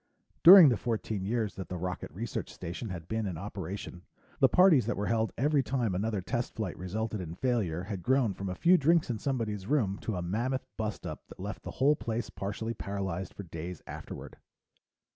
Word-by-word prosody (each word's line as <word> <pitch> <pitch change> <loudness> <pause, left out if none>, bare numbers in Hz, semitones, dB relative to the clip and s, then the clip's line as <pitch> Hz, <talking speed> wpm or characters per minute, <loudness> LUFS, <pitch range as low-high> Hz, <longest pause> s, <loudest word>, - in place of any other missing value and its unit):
During 180 -3 +11
the 120 - +1
fourteen 110 -4 -2
years 110 -1 -1
that 95 -3 -7
the 90 - -3
Rocket 90 +1 -4
Research 105 +6 -5
Station 90 +7 -6
had 85 -4 -6
been 110 0 -1
in 90 -4 -4
operation, 95 -1 -6 0.4
the - - +6
parties 170 - +5
that 120 - -1
were 100 - -1
held 110 +1 +1
every 145 +2 +3
time 125 -6 -1
another 105 +2 -1
test 120 +6 -3
flight 105 -6 -3
resulted 105 +3 -3
in 85 -1 -6
failure 100 -9 0
had 95 -1 -5
grown 130 -2 +2
from 95 +1 -5
a 90 - -3
few 175 - +5
drinks 160 -1 +3
in 110 - -3
somebody's 110 -7 -2
room 110 -9 +1
to 110 - -3
a 90 - -3
mammoth 120 +9 -1
bust 110 -1 -4
up - - -7
that - - -14
left - - -5
the - - -7
whole 145 +3 +4
place 115 -4 -3
partially 105 +4 -4
paralyzed 95 -4 -4
for 100 - -7
days 85 0 -7
afterward. - - -8
110 Hz, 200 wpm, -30 LUFS, 95-120 Hz, 0.4 s, During